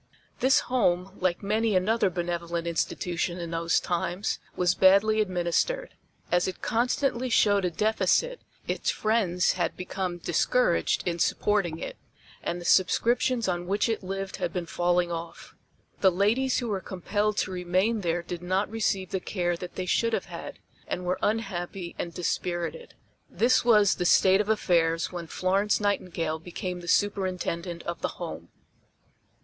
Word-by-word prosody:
This 260 +1 +4
home, 190 -6 0
like 180 0 0
many 215 +1 +1
another 200 +2 +2
benevolent 170 -1 -3
institution 170 +1 -2
in 170 -2 -5
those 165 0 +1
times, 175 +3 -2 0.2
was 180 -1 +2
badly 200 +4 +5
administered. 185 - -1 0.4
As 175 +1 +3
it 185 - -5
constantly 250 +2 0
showed 205 -4 +3
a - - +2
deficit, 220 - +1 0.3
its - - -1
friends 205 -5 +1
had 175 -3 -2
become 185 -1 -3
discouraged - - +1
in 170 -1 -1
supporting 185 -3 +1
it, - - -6 0.4
and 175 - -3
the 175 - -9
subscriptions 235 +6 +2
on 175 -1 -2
which 200 +4 +1
it 225 -1 -1
lived 195 +1 -5
had 170 - -2
been 180 -1 -3
falling 175 0 +1
off. 170 0 -7 0.5
The 190 - +6
ladies 225 +8 +2
who 240 - -2
were 195 -3 -1
compelled 205 +4 -2
to 190 - 0
remain 185 +5 0
there 170 -1 -1
did 175 0 -6
not 185 +4 -1
receive 195 -4 -1
the 190 - 0
care 175 -2 -1
that 175 +1 -8
they 185 - -3
should 230 +5 +1
have - - 0
had, - - -8 0.3
and 180 - -3
were 180 +1 -1
unhappy 190 -5 -2
and 170 - -3
dispirited. 175 - -3 0.3
This 245 +2 +3
was 210 -4 +5
the 180 - -3
state 190 +2 +5
of 210 - -4
affairs 165 -6 +2
when 175 -2 -6
Florence 195 +5 +1
Nightingale 175 -6 -1
became 180 +2 -5
the 175 - -10
Superintendent 180 -3 -1
of 170 -1 -5
the - - -3
Home. - - -7
185 Hz, 155 wpm, -27 LUFS, 175-210 Hz, 0.5 s, The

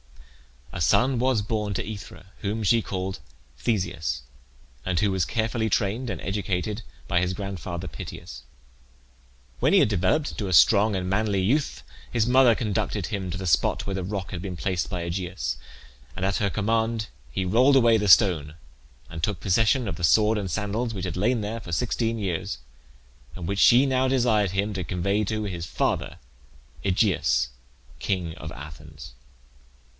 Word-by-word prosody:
A - - -4
son 125 - +3
was 125 -4 +2
born 105 -1 -2
to - - -1
Aethra, 100 -3 -9
whom 105 +2 -2
she 115 +3 +4
called 95 -2 -4 0.4
Theseus, 90 - -1 0.6
and 90 -3 0
who 100 +1 +2
was 95 -4 +1
carefully 110 0 -1
trained 110 +4 0
and - - -4
educated 100 +1 -2 0.3
by 85 - +2
his 90 +1 0
grandfather 95 -2 -5
Pittheus. - - -8 1.2
When - - +3
he - - +7
had - - +4
developed 95 - +1
into 100 - -4
a 95 - -2
strong 105 +5 +6
and 90 -1 -2
manly 100 0 +1
youth 135 +10 0 0.3
his 115 -3 +2
mother 125 -1 +5
conducted 105 -3 -2
him 100 -4 -3
to 85 - -4
the 95 - -5
spot 75 -6 +2
where 100 - -3
the 95 -1 -2
rock 95 0 -4
had 85 - -4
been 90 -2 -5
placed 90 -1 -1
by 90 -3 -3
Aegeus, 85 -7 -3 0.6
and 95 0 -2
at 95 0 +1
her 100 - +1
command 110 +2 0 0.2
he 90 +10 -2
rolled 125 +9 +4
away 120 -3 +5
the 105 -1 -1
stone, 85 -7 +5 0.5
and 80 - -7
took 105 +2 -1
possession 115 +5 +2
of - - -3
the 90 - -7
sword 110 +6 +4
and 100 -3 -3
sandals 110 +5 -2
which 95 -1 -3
had 90 -1 -4
lain 115 +4 +1
there 105 +3 -3
for 85 -6 -8
sixteen 115 +2 0
years, 95 -6 -3 0.8
and 90 - -6
which 100 +1 -1
she 125 +6 +7
now 130 -1 +2
desired 115 -7 +2
him 100 +2 -1
to 95 -2 -3
convey 100 +5 0
to 110 +1 -2
his 90 -5 -4
father - - -1 0.7
Aegeus, 75 - +2 0.5
king 90 -4 -2
of 80 -3 -8
Athens. 75 -4 -11
100 Hz, 170 wpm, -25 LUFS, 90-110 Hz, 1.2 s, he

